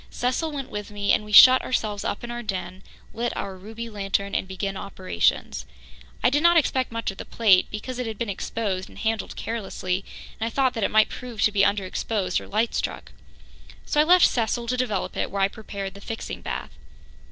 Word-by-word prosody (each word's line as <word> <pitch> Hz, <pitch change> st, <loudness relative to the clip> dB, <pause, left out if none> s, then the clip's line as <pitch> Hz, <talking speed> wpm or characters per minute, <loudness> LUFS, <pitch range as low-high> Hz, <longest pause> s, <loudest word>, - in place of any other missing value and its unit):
Cecil 255 Hz, +6 st, -1 dB
went 275 Hz, -3 st, -5 dB
with 210 Hz, -1 st, -5 dB
me, 205 Hz, -1 st, 0 dB
and -, -, +2 dB
we 210 Hz, -, -10 dB
shut 255 Hz, +4 st, +10 dB
ourselves 210 Hz, -5 st, -2 dB
up 205 Hz, -, -3 dB
in 240 Hz, -, -5 dB
our 240 Hz, 0 st, -4 dB
den, 185 Hz, -4 st, -5 dB, 0.3 s
lit 235 Hz, +1 st, -2 dB
our 195 Hz, -1 st, -4 dB
ruby 220 Hz, +5 st, -8 dB
lantern 200 Hz, -2 st, -2 dB
and -, -, -1 dB
began 195 Hz, +1 st, -3 dB
operations. 85 Hz, -, -1 dB, 0.6 s
I -, -, +5 dB
did 290 Hz, +2 st, +2 dB
not 340 Hz, +1 st, +6 dB
expect 260 Hz, -5 st, +1 dB
much 230 Hz, -3 st, -2 dB
of 195 Hz, -, -15 dB
the -, -, -4 dB
plate, 205 Hz, -5 st, +4 dB
because 240 Hz, +4 st, -6 dB
it 250 Hz, -, -2 dB
had 220 Hz, -2 st, -5 dB
been 235 Hz, -, -2 dB
exposed 195 Hz, -1 st, -3 dB
and -, -, -15 dB
handled 225 Hz, -1 st, -2 dB
carelessly, 195 Hz, -4 st, -3 dB, 0.4 s
and 225 Hz, -, -1 dB
I -, -, -1 dB
thought 260 Hz, +1 st, +1 dB
that 225 Hz, -, -2 dB
it -, -, +2 dB
might 215 Hz, 0 st, +4 dB
prove 245 Hz, -4 st, -5 dB
to 210 Hz, -, +4 dB
be 200 Hz, -1 st, +2 dB
underexposed 200 Hz, -1 st, 0 dB
or -, -, -11 dB
light 220 Hz, +3 st, 0 dB
struck. -, -, -3 dB, 0.7 s
So 295 Hz, -, +3 dB
I -, -, +5 dB
left 355 Hz, +3 st, +6 dB
Cecil 235 Hz, 0 st, 0 dB
to 250 Hz, -, +1 dB
develop 240 Hz, -6 st, -2 dB
it -, -, -1 dB
while 195 Hz, -1 st, 0 dB
I -, -, +5 dB
prepared 200 Hz, -2 st, -7 dB
the 200 Hz, -, -12 dB
fixing 225 Hz, +2 st, -6 dB
bath. -, -, -5 dB
215 Hz, 210 wpm, -25 LUFS, 195-240 Hz, 0.7 s, shut